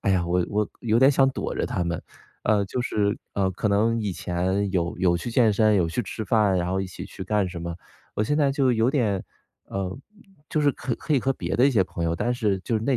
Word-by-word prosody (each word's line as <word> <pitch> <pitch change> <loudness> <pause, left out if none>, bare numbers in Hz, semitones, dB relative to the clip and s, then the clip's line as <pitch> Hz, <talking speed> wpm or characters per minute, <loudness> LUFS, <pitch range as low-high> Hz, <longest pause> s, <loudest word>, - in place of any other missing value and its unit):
“哎 95 - +2
呀， 90 -2 +2
我 90 0 +1
我 105 0 0
有 115 0 +2
点 135 +2 +7
想 135 -1 +4
躲 - - -4
着 - - 0
他 90 - -2
们。” 85 -1 -2 0.4
呃， 105 -1 +3
就 125 - -3
是 105 -4 0
呃， 95 -1 +1
可 100 - -2
能 115 +3 +2
以 100 -3 -1
前 95 +4 -1
有 85 -2 -1
有 90 -2 +3
去 100 +7 -5
健 115 -2 +4
身、 110 +1 +3
有 85 -4 +2
去 85 - -1
吃 110 +2 -5
饭， 100 -2 +3
然 90 0 -1
后 95 - 0
一 95 - -3
起 90 - -8
去 95 - -8
干 100 -1 +1
什 85 - -7
么， 85 -1 -4 0.4
我 105 - -1
现 145 +7 0
在 140 -3 +3
就 135 -2 +2
有 115 +1 +2
点 110 -9 0 0.4
呃， 95 -1 -4 0.5
就 155 - +1
是 145 - +4
可 130 +5 -2
以 135 - +4
和 135 +3 +1
别 90 -7 -3
的 125 - +5
一 - - +3
些 110 -7 +3
朋 85 -2 -4
友 85 - 0
但 120 +8 0
是 105 -5 0
就 115 - -1
是 110 - -3
那 140 - +1
100 Hz, 275 characters per minute, -25 LUFS, 95-120 Hz, 0.5 s, 点